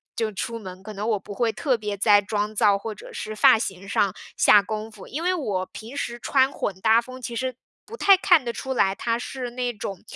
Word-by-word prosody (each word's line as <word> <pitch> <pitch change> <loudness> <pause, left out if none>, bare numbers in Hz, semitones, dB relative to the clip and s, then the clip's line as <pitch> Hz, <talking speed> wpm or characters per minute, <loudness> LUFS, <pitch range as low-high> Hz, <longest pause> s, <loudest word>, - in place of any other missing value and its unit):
就 220 -1 -1
出 230 +3 -4
门， 185 -3 -9
可 215 +1 -8
能 205 +2 -4
我 215 -3 +1
不 205 - -12
会 230 +2 +1
特 250 +4 0
别 210 -2 -4
在 205 +1 +5
妆 210 +1 -2
造 205 -2 +4
或 215 +2 -6
者 - - -12
是 215 0 -5
发 215 - +6
型 195 -3 -5
上 200 0 +1 0.2
下 205 - +6
功 215 +1 -5
夫。 215 -3 -12
因 300 - -5
为 360 - +2
我 205 - -2
平 225 +7 -10
时 240 -4 -3
穿 265 +2 +2
混 200 - -3
搭 220 +2 +5
风， 255 +2 -11
其 235 -1 -5
实 255 +1 -2 0.3
不 445 - -9
太 395 -4 +6
看 355 -6 +4
得 240 - -2
出 265 +3 -4
来 195 -6 +2
它 230 +2 -1
是 250 0 -5
那 245 0 -2
种 195 -3 -6
220 Hz, 255 characters per minute, -24 LUFS, 205-250 Hz, 0.3 s, 发